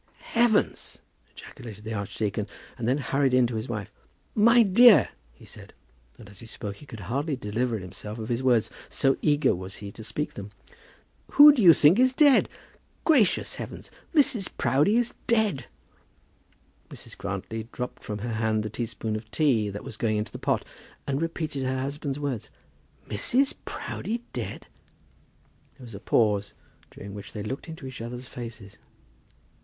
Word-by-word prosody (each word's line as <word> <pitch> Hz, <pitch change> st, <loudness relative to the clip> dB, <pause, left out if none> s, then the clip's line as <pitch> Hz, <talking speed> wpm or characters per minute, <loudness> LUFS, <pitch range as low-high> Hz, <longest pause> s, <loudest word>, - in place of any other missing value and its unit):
"Heavens!" 230 Hz, -2 st, +1 dB, 0.3 s
ejaculated 105 Hz, -3 st, -11 dB
the 110 Hz, +1 st, -5 dB
archdeacon, 105 Hz, 0 st, -3 dB, 0.3 s
and 115 Hz, -3 st, -4 dB
then 130 Hz, +3 st, +2 dB
hurried 135 Hz, -1 st, +1 dB
in 130 Hz, -1 st, +5 dB
to 120 Hz, -, -3 dB
his 110 Hz, +3 st, -4 dB
wife. 105 Hz, -4 st, -4 dB, 0.4 s
"My 235 Hz, +3 st, +6 dB
dear," 220 Hz, +3 st, +7 dB, 0.2 s
he 60 Hz, -, -18 dB
said -, -, -13 dB, 0.4 s
and 110 Hz, -, -13 dB
as 100 Hz, 0 st, -14 dB
he 115 Hz, -, -10 dB
spoke 100 Hz, -2 st, -6 dB
he 145 Hz, -, -15 dB
could 110 Hz, -5 st, -9 dB
hardly 140 Hz, -, -2 dB
deliver 115 Hz, 0 st, -2 dB
himself 105 Hz, +3 st, -8 dB
of 110 Hz, -1 st, -5 dB
his 120 Hz, +1 st, -1 dB
words, 125 Hz, -4 st, +2 dB, 0.2 s
so 135 Hz, 0 st, +2 dB
eager 145 Hz, -2 st, +3 dB
was 95 Hz, +1 st, -7 dB
he 100 Hz, -1 st, -8 dB
to 110 Hz, -, -11 dB
speak 115 Hz, +8 st, -4 dB
them 100 Hz, +1 st, -8 dB, 0.8 s
"who 295 Hz, +1 st, +10 dB
do 265 Hz, -, 0 dB
you 175 Hz, -4 st, +9 dB
think 155 Hz, +9 st, +5 dB
is 255 Hz, 0 st, +4 dB
dead? 285 Hz, -2 st, +5 dB, 0.6 s
Gracious 265 Hz, -, +3 dB
heavens! -, -, -8 dB, 0.2 s
Mrs. 255 Hz, -, +3 dB
Proudie 140 Hz, -, +3 dB
is 240 Hz, -1 st, 0 dB
dead!" 215 Hz, -, +1 dB, 1.2 s
Mrs. -, -, -10 dB
Grantly 110 Hz, 0 st, -5 dB
dropped 125 Hz, 0 st, -6 dB
from 105 Hz, -, -4 dB
her 120 Hz, -, -3 dB
hand 110 Hz, -1 st, 0 dB
the 110 Hz, -, -5 dB
teaspoonful 110 Hz, -1 st, -3 dB
of 110 Hz, -, -26 dB
tea 115 Hz, -6 st, +2 dB
that 100 Hz, +1 st, -7 dB
was -, -, -8 dB
just 110 Hz, -, -13 dB
going 110 Hz, -2 st, +1 dB
into 105 Hz, -, -3 dB
the -, -, -8 dB
pot, -, -, 0 dB, 0.4 s
and 140 Hz, +1 st, -1 dB
repeated 160 Hz, -4 st, -3 dB
her 130 Hz, 0 st, -1 dB
husband's 140 Hz, +1 st, -3 dB
words. 140 Hz, -7 st, -3 dB, 0.6 s
"Mrs. 250 Hz, -, +1 dB
Proudie 230 Hz, +2 st, -4 dB
dead?" -, -, -5 dB, 1.1 s
There 130 Hz, -, -12 dB
was 115 Hz, -, -11 dB
a 100 Hz, -, -7 dB
pause, 105 Hz, -2 st, +1 dB, 0.3 s
during 100 Hz, 0 st, -10 dB
which 100 Hz, 0 st, -9 dB
they 105 Hz, -, -5 dB
looked 130 Hz, +10 st, -5 dB
into 160 Hz, -4 st, -8 dB
each 130 Hz, -3 st, -7 dB
other's 120 Hz, +2 st, -7 dB
faces. 115 Hz, -5 st, -9 dB
125 Hz, 170 wpm, -26 LUFS, 110-155 Hz, 1.2 s, who